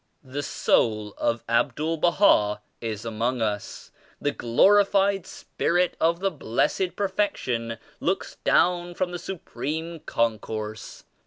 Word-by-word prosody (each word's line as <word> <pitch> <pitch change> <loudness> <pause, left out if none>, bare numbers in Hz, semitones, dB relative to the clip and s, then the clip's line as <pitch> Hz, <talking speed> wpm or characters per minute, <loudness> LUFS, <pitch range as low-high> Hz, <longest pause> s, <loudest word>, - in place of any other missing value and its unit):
The 135 +2 -4
soul 105 -6 +1
of 115 0 0
Abdul 145 +7 +1
Baha 150 - +4 0.2
is 110 -1 -4
among 115 +3 -1
us; 105 -2 -3 0.3
the 145 - 0
glorified 195 - +3
Spirit 175 +2 0
of 170 +2 +2
the 195 0 +1
Blessed 180 +10 0
Perfection 130 - -1 0.2
looks - - -2
down 175 0 +2
from 180 0 -1
the 175 - -4
Su 190 +2 -5
preme 160 +1 -5
Concourse. 110 -1 -2
145 Hz, 115 wpm, -25 LUFS, 115-180 Hz, 0.3 s, Baha